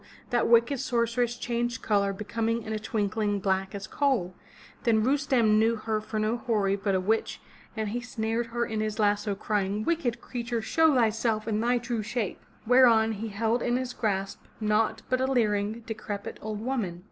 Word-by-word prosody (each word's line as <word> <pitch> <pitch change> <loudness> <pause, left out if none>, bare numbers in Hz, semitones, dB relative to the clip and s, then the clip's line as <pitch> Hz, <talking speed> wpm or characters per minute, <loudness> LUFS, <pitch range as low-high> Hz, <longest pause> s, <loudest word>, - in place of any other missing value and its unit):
that 240 -1 +2
wicked 235 +4 +4
sorceress 240 0 0
changed 240 0 -2
color 200 -2 +2
becoming 225 +3 -2
in 220 - -4
a 215 - -2
twinkling 210 -1 -1
black 190 0 -1
as 200 -1 -5
coal. 250 -11 0 0.5
Then 220 -2 +3
Rustem 255 -5 +3
knew 225 +1 +3
her 220 -1 -2
for 215 0 -5
no 215 +2 +1
houri 210 -5 +1
but 195 -1 -1
a - - +2
witch 220 +4 0 0.4
and 215 -1 -1
he 240 +3 -3
snared 230 -1 -2
her 235 +1 -1
in 220 -2 -3
his 215 0 -2
lasso 205 -1 +1
crying, 205 0 -1
"Wicked 275 -6 0
creature, 240 -1 -3
show 320 +6 +3
thyself 225 -2 +1
in 215 -1 0
thy 240 +2 +2
true 235 -1 -2
shape!'' 215 -1 -3 0.2
Whereon 230 -2 +5
he 220 +1 -4
held 225 +3 0
in 245 0 +1
his 255 -1 -3
grasp 195 -3 -2 0.2
naught 215 0 +1
but 255 0 +1
a 260 - +2
leering, 215 -2 +1
decrepit, 210 -2 -6
old 215 -1 -4
woman. 225 -9 -2
220 Hz, 180 wpm, -28 LUFS, 210-240 Hz, 0.5 s, Whereon